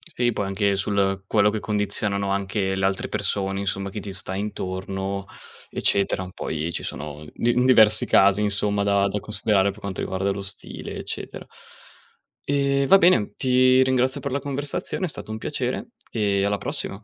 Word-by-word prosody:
Sì 120 0 +2
poi 105 -2 -2
anche 100 0 +1
sul 95 -1 0
quello 105 0 +3
che 110 0 -2
condizionano 105 -1 -1
anche 95 0 -1
le 95 0 0
altre 95 0 0
persone, 100 -1 -1
insomma, 100 0 -2
chi 105 +2 -6
ti 100 -1 -7
sta 95 0 -4
intorno 95 -1 -4 0.5
eccetera, 95 -2 +1
poi 80 +1 -3
ci - - -5
sono 75 +1 -6
di 120 - +1
diversi 110 -4 +6
casi 100 +1 +4
insomma 105 0 +1
da 100 0 +3
da 105 +1 -2
considerare 100 -2 +1
per 105 - -14
quanto 100 -2 -5
riguarda 95 +1 -1
lo 100 0 -3
stile 100 - -7
eccetera. - - -7 1.0
Ehm, 140 -1 +2
va 195 - +9
bene 145 - +4
ti 130 0 +4
ringrazio 130 0 +1
per 140 - -4
la 140 - 0
conversazione, 145 +6 -3
è - - -1
stato 110 - -8
un 110 - -3
piacere - - -3 0.2
e 100 -3 +1
alla 100 0 +1
prossima. 100 +1 -5
100 Hz, 170 wpm, -24 LUFS, 95-110 Hz, 1.0 s, va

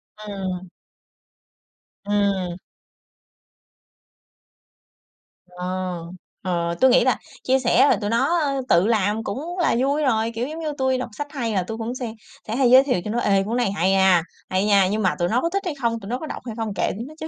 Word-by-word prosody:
Ừm. 195 -3 -5 1.4
Ừm. 200 -4 0 2.9
Ờ, 180 0 -8 0.8
ờ, 170 -2 -1
tui 260 0 +6
nghĩ 255 - +5
là - - +2 0.3
chia 260 +1 +3
sẻ 250 +2 +4
rồi - - +4
tụi 205 - -1
nó 315 +9 +2 0.3
tự 175 +4 +4
làm 215 -1 +1
cũng 305 - -5
là 345 - +2
vui 280 +4 +1
rồi, 225 -3 +1
kiểu, 240 +3 -2
giống 315 +2 -6
như 310 -2 -3
tui 260 -1 +1
đọc 255 - -4
sách 290 - -3
hay 235 -7 -2
là 190 - +1
tui 220 +5 -6
cũng 230 +2 -4
se 245 -4 -5 0.3
sẽ 220 - -2
hay 255 -1 +3
giới 260 +1 +8
thiệu 250 -10 0
cho 210 - -3
nó: 235 - 0
"Ê! 195 -3 +2
Cuốn 230 +4 -1
này 240 -5 +1
hay 190 -1 +1
ha, 190 -3 +4 0.3
hay 185 +2 +1
nha!", 200 -2 +4
nhưng 215 +1 0
mà 185 -3 +1
tụi 175 - +1
nó 245 +3 +2
có 335 - 0
thích 395 +3 -1
hay 340 -5 -2
không, 230 -1 0
tụi 200 -1 -9
nó 245 - -1
có 315 - -6
đọc - - -6
hay 230 -3 -6
không 220 -2 -3
kệ - - 0
tụi 225 +4 -6
nó 305 - -11
chứ, 315 - -5
225 Hz, 210 wpm, -23 LUFS, 195-260 Hz, 2.9 s, giới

